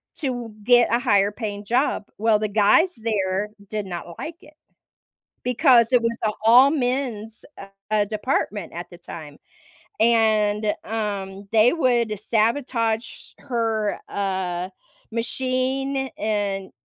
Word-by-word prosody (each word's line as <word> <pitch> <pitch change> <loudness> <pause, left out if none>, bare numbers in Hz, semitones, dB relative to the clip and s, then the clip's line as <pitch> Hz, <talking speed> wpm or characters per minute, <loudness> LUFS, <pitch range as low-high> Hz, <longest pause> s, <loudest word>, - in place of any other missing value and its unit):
to 245 -6 -3
get 240 0 +4
a 235 - +3
higher 205 -5 +3
paying 205 -2 -5
job. 245 +1 +1
Well, 215 0 +3
the 215 -1 -2
guys 220 - +4
there 200 -2 -1 0.2
did 210 -2 -3
not 175 -2 -7
like 330 +1 -6
it 305 - -17 0.9
because 250 -1 +4
it 245 - +5
was 230 0 -1
a 215 - +2
all 255 +5 +7
men's, 245 -6 -2 0.5
uh, 210 -1 +3
department 210 -4 -2
at 175 +1 -7
the 175 - -12
time. 155 -4 -10 0.6
And, 215 -2 +3
um, 200 -3 -4
they 225 +4 +5
would 240 - +1
sabotage 230 +1 -1
her, 225 -5 -1
uh, 185 -2 -2 0.4
machine 260 +3 -1
and 200 -3 -2
220 Hz, 120 wpm, -23 LUFS, 205-245 Hz, 0.9 s, all